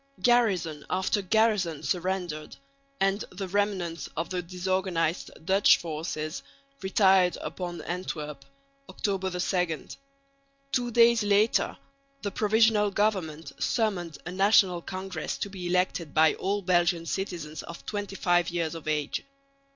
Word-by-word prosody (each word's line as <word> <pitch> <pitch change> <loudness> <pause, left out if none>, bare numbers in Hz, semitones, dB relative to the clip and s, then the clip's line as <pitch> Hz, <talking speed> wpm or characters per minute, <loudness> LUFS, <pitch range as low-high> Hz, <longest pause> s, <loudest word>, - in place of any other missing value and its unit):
Garrison 195 -11 +2
after 190 +3 +1
garrison 200 -6 +1
surrendered; 180 -4 -2 0.4
and 195 +2 +1
the 190 +1 -6
remnants 185 -4 -1
of 165 +3 -2
the 180 -1 -1
disorganised 180 -1 -1 0.2
Dutch 195 +3 +5
forces 155 -1 -4 0.4
retired 190 -2 +4
upon 175 -2 -5
Antwerp 150 -5 -5 0.5
(October 195 -2 -1
2). 180 -2 -1 0.8
Two 245 -2 0
days 235 0 +5
later 205 +2 +2 0.5
the 200 - -2
Provisional 215 0 +3
Government 190 -7 -1
summoned 190 -8 0
a 175 - -4
National 190 -2 +4
Congress 185 -3 -5
to 200 - -4
be 185 -2 -5
elected 175 -3 0
by 155 0 +5
all 200 +1 -2
Belgian 175 -1 +2
citizens 170 -5 -4
of 170 - -10
25 195 -4 0
years 170 -2 -2
of 165 -2 -8
age. 150 -2 -1
185 Hz, 120 wpm, -28 LUFS, 170-200 Hz, 0.8 s, Dutch